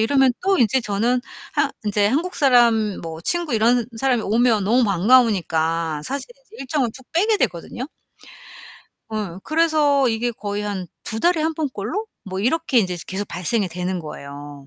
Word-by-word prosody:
이러면 265 +3 +4
또 390 +1 +2
인제 245 +1 +3
저는 230 +3 0 0.3
한 - - +1
인제 205 -1 +2
한국 320 - 0
사람 235 - +3
뭐 165 -1 -7
친구 345 - -1
이런 235 +2 +3
사람이 250 -2 +1
오면 225 0 +2
너무 240 +4 +3
반가우니까 170 -7 +2
사실 280 - -4 0.2
이제 445 - -16
일정을 270 -1 0
쭉 260 - -13
빼게 420 +6 +3
되거든요. 235 - -3 1.2
어, 210 -5 -4
그래서 310 -4 +3
이게 230 +1 0
거의 205 -2 -4
한 200 -3 -4 0.2
2 220 - -2
달에 345 +1 +3
1 320 +1 0
번 305 -2 -1
꼴로 325 - -4 0.2
뭐 190 0 -4
이렇게 270 +2 +1
인제 180 -5 +1
계속 195 +2 -4
발생이 205 +1 -1
되는 180 +1 -3
거예요. 145 -2 -9
225 Hz, 310 characters per minute, -21 LUFS, 195-270 Hz, 1.2 s, 이러면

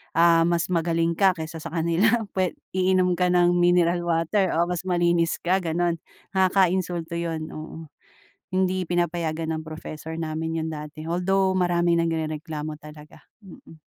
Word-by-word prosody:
ah, 165 0 +5
mas 170 -1 +1
magaling 165 -1 +1
ka 195 +2 +4
kaysa 160 -1 -6
sa - - -6
kanila 185 +8 +2
pwe 185 -2 +1 0.2
iinom 185 -1 +3
ka 180 -1 +2
ng 175 0 +4
mineral 175 0 +3
water 170 +3 +1
o 170 +1 +2
mas 180 0 -2
malinis 175 -2 +2
ka 185 +2 +2
gano'n 170 +1 0 0.4
nakaka-insulto 185 -3 +1
'yon, 165 -2 -3
oo. 160 +1 -8 0.7
Hindi 185 -1 +1
pinapayagan 170 -2 -1
ng - - -6
professor 155 0 -7
namin 160 0 -3
yun 160 - -3
dati, 150 0 -8
although 190 +3 +1
maraming 175 -2 +2
nagrereklamo 155 -2 -3
talaga, 150 0 -13 0.2
mm. 165 -4 -15
170 Hz, 140 wpm, -24 LUFS, 160-180 Hz, 0.7 s, ah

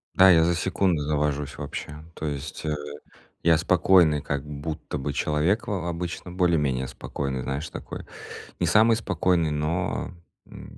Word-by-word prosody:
Да, 95 0 +8
я 80 -2 +6
за 85 +1 +2
секунду 90 -3 +1
завожусь 75 -1 -1
вообще. 75 +2 -6
То - - -5
есть, 75 +2 -5
э, 75 - 0 0.7
я 80 -1 +5
спокойный, 85 -3 +4
как 70 0 -3
будто 75 +1 -5
бы 70 +1 -3
человек 75 +11 +1
во 100 -4 -1
во 85 - -3
обычно, 85 +1 -5
более-менее 75 -8 +1
спокойный, 65 +1 -4
знаешь, 70 +4 -3
такой - - -8 0.5
не - - +1
самый 110 +1 +5
спокойный, 90 -6 +1
но, 75 +3 -2 0.3
м, - - -12
80 Hz, 150 wpm, -25 LUFS, 75-90 Hz, 0.7 s, Да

